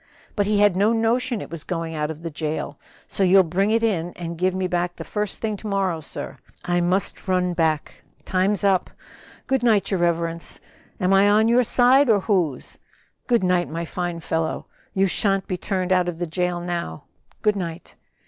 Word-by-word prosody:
But 205 Hz, -2 st, +1 dB
he 210 Hz, 0 st, +2 dB
had 205 Hz, -2 st, +4 dB
no 205 Hz, +4 st, +3 dB
notion 230 Hz, 0 st, 0 dB
it -, -, -9 dB
was 165 Hz, -2 st, -6 dB
going 165 Hz, -2 st, -4 dB
out 150 Hz, -1 st, -2 dB
of 160 Hz, +1 st, -7 dB
the 165 Hz, -, -4 dB
jail; 150 Hz, -1 st, -4 dB, 0.3 s
so -, -, -2 dB
you'll 190 Hz, 0 st, +6 dB
bring 185 Hz, +4 st, 0 dB
it 225 Hz, +1 st, +2 dB
in 175 Hz, -6 st, 0 dB
and 170 Hz, -1 st, -5 dB
give 185 Hz, +2 st, 0 dB
it -, -, -2 dB
me 190 Hz, -, -1 dB
back 175 Hz, 0 st, -1 dB
the -, -, -7 dB
first 210 Hz, -1 st, -3 dB
thing 215 Hz, -2 st, -1 dB
to 215 Hz, -, -8 dB
morrow, 190 Hz, -5 st, 0 dB
sir. 150 Hz, -, -7 dB, 0.3 s
I 175 Hz, 0 st, +1 dB
must 185 Hz, +3 st, 0 dB
run 180 Hz, -1 st, +1 dB
back, 160 Hz, -3 st, -1 dB, 0.2 s
time's 190 Hz, +1 st, +1 dB
up! 195 Hz, -2 st, +2 dB, 0.6 s
Good 265 Hz, -2 st, +1 dB
night, 220 Hz, -5 st, +2 dB
your 190 Hz, -, +1 dB
reverence. 170 Hz, -1 st, 0 dB, 0.4 s
Am 185 Hz, +1 st, +2 dB
I 195 Hz, +1 st, +5 dB
on 215 Hz, +2 st, +4 dB
your 240 Hz, +2 st, +5 dB
side 250 Hz, +3 st, +4 dB
or 205 Hz, -3 st, +4 dB
whose?" 175 Hz, -, -1 dB, 0.5 s
"Good 235 Hz, -5 st, +2 dB
night, 180 Hz, -1 st, +2 dB
my 165 Hz, +2 st, -4 dB
fine 175 Hz, 0 st, -4 dB
fellow; 160 Hz, 0 st, -2 dB, 0.3 s
you 195 Hz, 0 st, +3 dB
shan't 195 Hz, 0 st, +1 dB
be 185 Hz, -, -2 dB
turned 185 Hz, 0 st, -2 dB
out 180 Hz, -1 st, +2 dB
of 170 Hz, -, -6 dB
the 175 Hz, -, -2 dB
jail 180 Hz, +1 st, -1 dB
now. 170 Hz, -, -4 dB, 0.4 s
Good 210 Hz, -1 st, +3 dB
night." 170 Hz, -4 st, -6 dB
185 Hz, 200 wpm, -23 LUFS, 170-205 Hz, 0.6 s, you'll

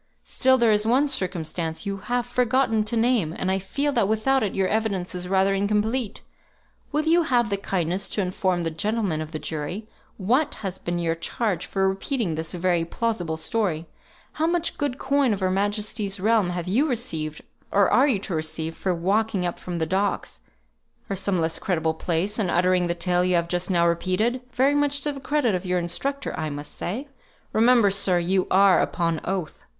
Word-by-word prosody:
Still 260 Hz, 0 st, +3 dB
there 235 Hz, -3 st, +4 dB
is 210 Hz, 0 st, +3 dB
one 265 Hz, +5 st, +3 dB
circumstance 175 Hz, -, -2 dB
you 200 Hz, 0 st, -2 dB
have 245 Hz, +4 st, -2 dB
forgotten 245 Hz, -2 st, +1 dB
to 230 Hz, +2 st, -1 dB
name; 225 Hz, -9 st, +2 dB
and 190 Hz, -, -1 dB
I 190 Hz, -, +1 dB
feel 280 Hz, +10 st, -1 dB
that 230 Hz, -7 st, +2 dB
without 240 Hz, +5 st, +2 dB
it 205 Hz, -, -1 dB
your 190 Hz, -1 st, +1 dB
evidence 200 Hz, -5 st, -1 dB
is 180 Hz, 0 st, -4 dB
rather 190 Hz, +1 st, +2 dB
incomplete. 210 Hz, +4 st, -1 dB, 0.7 s
Will 305 Hz, +1 st, 0 dB
you 335 Hz, +2 st, +4 dB
have 240 Hz, -9 st, +1 dB
the 200 Hz, -, +1 dB
kindness 190 Hz, -1 st, -1 dB
to 210 Hz, -, -1 dB
inform 185 Hz, -1 st, 0 dB
the 165 Hz, -, -1 dB
gentlemen 200 Hz, -1 st, -1 dB
of 155 Hz, 0 st, -6 dB
the 155 Hz, -, -3 dB
jury 160 Hz, +8 st, -5 dB, 0.3 s
what 255 Hz, +10 st, +1 dB
has 190 Hz, 0 st, -4 dB
been 175 Hz, 0 st, -3 dB
your 170 Hz, -1 st, 0 dB
charge 190 Hz, +4 st, -2 dB
for 195 Hz, -1 st, +1 dB
repeating 195 Hz, -, -1 dB
this 160 Hz, +1 st, -3 dB
very 175 Hz, -1 st, +1 dB
plausible 175 Hz, -3 st, -2 dB
story? 165 Hz, -2 st, -1 dB, 0.5 s
How 315 Hz, +1 st, 0 dB
much 340 Hz, 0 st, -1 dB
good 285 Hz, -4 st, -1 dB
coin 275 Hz, -4 st, +2 dB
of 200 Hz, -, -3 dB
Her 185 Hz, -1 st, +1 dB
Majesty's 205 Hz, +1 st, -1 dB
realm 215 Hz, -2 st, +2 dB
have 175 Hz, -1 st, -4 dB
you 250 Hz, +12 st, +2 dB
received, 165 Hz, -, -3 dB, 0.3 s
or 200 Hz, -1 st, +4 dB
are 265 Hz, +3 st, +4 dB
you 255 Hz, -7 st, +2 dB
to 200 Hz, -, -4 dB
receive, 160 Hz, 0 st, -3 dB
for 185 Hz, -2 st, -1 dB
walking 195 Hz, +2 st, 0 dB
up 175 Hz, -, -3 dB
from 180 Hz, -, -5 dB
the 165 Hz, -1 st, 0 dB
docks, 195 Hz, +4 st, -1 dB, 0.7 s
or -, -, 0 dB
some 195 Hz, -1 st, 0 dB
less 160 Hz, 0 st, 0 dB
creditable 160 Hz, -4 st, 0 dB
place, 175 Hz, +6 st, -1 dB
and 195 Hz, -5 st, +1 dB
uttering 180 Hz, 0 st, +2 dB
the 170 Hz, -, -1 dB
tale 180 Hz, 0 st, +1 dB
you 180 Hz, 0 st, +2 dB
have 170 Hz, 0 st, +1 dB
just 175 Hz, +1 st, -1 dB
now 170 Hz, -2 st, +3 dB
repeated, 185 Hz, +9 st, 0 dB
very 265 Hz, +3 st, +3 dB
much 290 Hz, -1 st, +1 dB
to 295 Hz, -, -1 dB
the 280 Hz, -, -7 dB
credit 280 Hz, -5 st, +1 dB
of 180 Hz, 0 st, -1 dB
your 180 Hz, 0 st, +1 dB
instructor, 270 Hz, +12 st, -2 dB
I 155 Hz, -1 st, -3 dB
must 145 Hz, 0 st, -7 dB
say? 240 Hz, +11 st, -4 dB, 0.5 s
Remember, 230 Hz, -2 st, +5 dB
sir, 195 Hz, -2 st, +2 dB
you 180 Hz, +2 st, +1 dB
are 195 Hz, 0 st, +5 dB
upon 165 Hz, -2 st, -1 dB
oath." 185 Hz, -4 st, -3 dB
195 Hz, 195 wpm, -24 LUFS, 175-235 Hz, 0.7 s, Remember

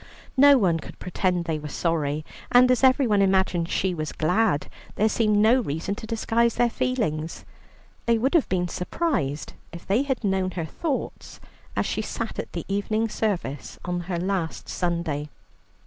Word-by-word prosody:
No 280 Hz, +1 st, +7 dB
one 175 Hz, -8 st, +2 dB
could -, -, -10 dB
pretend 180 Hz, -1 st, -1 dB
they 160 Hz, -2 st, -1 dB
were 150 Hz, -, -6 dB
sorry, 155 Hz, -1 st, -1 dB, 0.3 s
and 250 Hz, +1 st, +6 dB
as 255 Hz, -, +2 dB
everyone 255 Hz, -6 st, +4 dB
imagined 190 Hz, -3 st, +2 dB
she 190 Hz, -1 st, 0 dB
was 155 Hz, -2 st, -3 dB
glad, 180 Hz, -1 st, +1 dB, 0.3 s
there 215 Hz, -, +3 dB
seemed 215 Hz, -1 st, +2 dB
no 220 Hz, +5 st, +5 dB
reason 160 Hz, 0 st, -3 dB
to 220 Hz, -, -8 dB
disguise 230 Hz, +1 st, +1 dB
their 240 Hz, -1 st, +2 dB
feelings. 170 Hz, -14 st, -2 dB, 0.6 s
They 230 Hz, -1 st, +4 dB
would 260 Hz, +5 st, 0 dB
have 335 Hz, -5 st, +3 dB
been 180 Hz, -1 st, +1 dB
surprised 180 Hz, -, -2 dB, 0.2 s
if 170 Hz, +1 st, -10 dB
they 205 Hz, +6 st, +2 dB
had 270 Hz, -4 st, -2 dB
known 190 Hz, -2 st, +1 dB
her 165 Hz, -, -1 dB
thoughts 285 Hz, -, -4 dB, 0.4 s
as -, -, +1 dB
she -, -, -1 dB
sat -, -, -4 dB
at -, -, -6 dB
the -, -, -4 dB
evening 215 Hz, +3 st, 0 dB
service 180 Hz, -11 st, -3 dB
on 180 Hz, 0 st, -1 dB
her 175 Hz, -, -1 dB
last 180 Hz, -2 st, -2 dB
Sunday. 170 Hz, -4 st, -2 dB
190 Hz, 165 wpm, -25 LUFS, 170-230 Hz, 0.6 s, No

